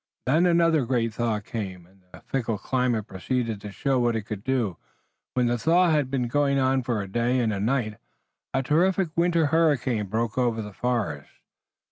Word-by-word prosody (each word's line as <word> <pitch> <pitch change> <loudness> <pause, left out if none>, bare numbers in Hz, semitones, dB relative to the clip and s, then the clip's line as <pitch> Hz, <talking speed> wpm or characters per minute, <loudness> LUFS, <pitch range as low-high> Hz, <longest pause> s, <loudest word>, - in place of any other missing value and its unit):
Then 160 +7 +3
another 165 -3 +3
great 115 -3 0
thaw 115 -2 -1
came, 95 -5 -6
and 95 +2 -25
the - - -13
fickle 115 -5 -2
climate 125 -2 0
proceeded 115 +2 -3
to 105 - -7
show 135 +4 0
what 120 -1 +1
it 110 - -2
could 105 -1 -6
do. 120 -9 -1 0.6
When 125 -1 +2
the 120 0 0
thaw 170 +7 +4
had 145 -4 +1
been 130 -2 -1
going 140 +2 +1
on 130 0 +2
for 120 -4 -2
a - - -8
day 120 +5 0
and 115 -3 +1
a 100 - -3
night 110 -1 0 0.5
a 135 - 0
terrific 175 +6 +2
winter 170 -1 +2
hurricane 135 -10 +2
broke 110 +4 -1
over 115 -3 0
the 105 -1 -9
forest. 120 0 -2
120 Hz, 185 wpm, -25 LUFS, 110-140 Hz, 0.6 s, thaw